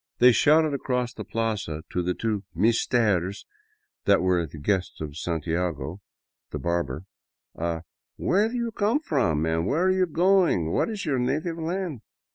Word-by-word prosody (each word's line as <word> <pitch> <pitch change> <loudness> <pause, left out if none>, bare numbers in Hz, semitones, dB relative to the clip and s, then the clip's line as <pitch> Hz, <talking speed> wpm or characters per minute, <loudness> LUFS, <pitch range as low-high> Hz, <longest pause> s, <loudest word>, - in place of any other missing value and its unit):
They 125 +1 +7
shouted 155 +6 +4
across 125 -3 -1
the - - -6
plaza 105 -9 -2
to 90 - 0
the 90 +1 -1
two 110 -3 -2
" - - -38
meestares 105 -3 +2 0.3
" 425 0 -48
that 100 -2 +4
were 90 -3 +2
the 75 - -11
guests 95 +5 -1
of 75 -2 -6
Santiago, 85 +1 -2 0.5
the - - -4
barber, 85 -4 -2 0.5
a 85 -1 -3 0.2
" - - -67
Where 205 +4 +2
do 245 - -6
you 235 -1 -1
come 215 +4 +1
f - - -21
rom 80 - +2
where 85 - +1
are 185 - +4
you 185 -1 +2
going 170 - +3
what - - +1
is 215 -4 -4
your 140 -5 0
native 155 +7 -1
land 165 - -3
110 Hz, 175 wpm, -26 LUFS, -, 0.5 s, They